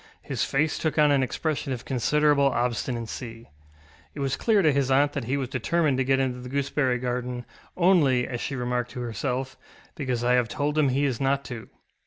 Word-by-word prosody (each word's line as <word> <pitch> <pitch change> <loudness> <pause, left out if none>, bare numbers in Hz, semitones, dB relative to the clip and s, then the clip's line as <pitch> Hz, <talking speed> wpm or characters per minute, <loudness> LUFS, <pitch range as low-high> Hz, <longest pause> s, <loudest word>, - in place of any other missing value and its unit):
His - - -2
face 150 +3 0
took 155 -1 -1
on 150 -1 +5
an 140 -1 +3
expression 140 +2 -2
of 125 - -7
considerable 140 +3 +3
obstinacy. 120 -2 -3 0.6
It - - -7
was 135 -1 0
clear 215 -4 +2
to 155 - +5
his 140 -1 +1
aunt 145 +2 +3
that 140 -5 -3
he 135 +4 0
was 135 -2 -2
determined 140 +2 +1
to - - +3
get 135 +1 +2
into 130 -2 -1
the 125 0 -8
gooseberry 135 -1 0
garden, 125 0 -3 0.3
ŌĆ£only, 165 -9 +4
ŌĆØ - - -2
as 120 -2 -4
she 140 - -3
remarked 125 -1 -2
to 125 - -5
herself, 130 +2 -3 0.4
ŌĆ£because 130 -5 -2
I 125 +1 +3
have 125 -2 +3
told 145 +1 -1
him 150 -3 +3
he 140 +3 +1
is 135 -2 -1
not 140 +1 +1
to. 120 -4 -7
135 Hz, 205 wpm, -26 LUFS, 125-145 Hz, 0.6 s, on